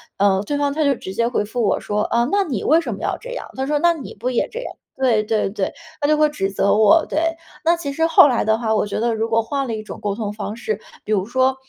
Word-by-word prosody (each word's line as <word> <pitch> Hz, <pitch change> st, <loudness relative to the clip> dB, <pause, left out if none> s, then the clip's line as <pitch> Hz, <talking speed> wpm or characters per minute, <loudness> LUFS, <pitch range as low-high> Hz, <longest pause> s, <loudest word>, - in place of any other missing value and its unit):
呃， 195 Hz, -1 st, +3 dB
对 285 Hz, +8 st, -2 dB
方 285 Hz, -1 st, +1 dB
他 310 Hz, -1 st, 0 dB
就 275 Hz, -2 st, +3 dB
直 190 Hz, -, -8 dB
接 230 Hz, +3 st, +1 dB
回 240 Hz, -, 0 dB
复 235 Hz, +4 st, -3 dB
我 -, -, +1 dB
说： 210 Hz, 0 st, -1 dB
“啊， 235 Hz, 0 st, +2 dB
那 400 Hz, -1 st, +2 dB
你 245 Hz, -, -3 dB
为 315 Hz, +3 st, +4 dB
什 335 Hz, -, -3 dB
么 -, -, -11 dB
要 -, -, -1 dB
这 -, -, -9 dB
样？” -, -, -6 dB
他 265 Hz, -, -1 dB
说： 295 Hz, 0 st, +1 dB
“那 345 Hz, -, +6 dB
你 315 Hz, -7 st, -7 dB
不 240 Hz, +5 st, -2 dB
也 245 Hz, -, 0 dB
这 485 Hz, +2 st, -6 dB
样。” -, -, -6 dB, 0.3 s
对， 230 Hz, -5 st, +3 dB
对， 215 Hz, -2 st, 0 dB
对， 195 Hz, -1 st, -2 dB, 0.3 s
他 290 Hz, -, +1 dB
就 305 Hz, -, +4 dB
会 305 Hz, 0 st, +5 dB
指 195 Hz, -10 st, -2 dB
责 200 Hz, +1 st, +2 dB
我， 220 Hz, +10 st, +5 dB
对。 315 Hz, -, 0 dB, 0.4 s
那 335 Hz, +1 st, +3 dB
其 285 Hz, -4 st, -4 dB
实 325 Hz, +3 st, +1 dB
后 325 Hz, -2 st, +7 dB
来 250 Hz, -4 st, +1 dB
的 220 Hz, 0 st, +2 dB
话， 225 Hz, -1 st, 0 dB
我 210 Hz, -, +1 dB
觉 205 Hz, -, -3 dB
得 235 Hz, 0 st, +1 dB
如 225 Hz, +1 st, -1 dB
果 225 Hz, 0 st, +3 dB
换 275 Hz, +4 st, -2 dB
了 235 Hz, -, -3 dB
一 215 Hz, -, -4 dB
种 215 Hz, -, -9 dB
沟 205 Hz, -1 st, -1 dB
通 210 Hz, -1 st, -4 dB
方 210 Hz, +1 st, -5 dB
式， 220 Hz, -3 st, -2 dB, 0.3 s
比 215 Hz, -, 0 dB
如 190 Hz, -3 st, +1 dB
说 260 Hz, +3 st, +1 dB
235 Hz, 315 characters per minute, -20 LUFS, 215-290 Hz, 0.4 s, 后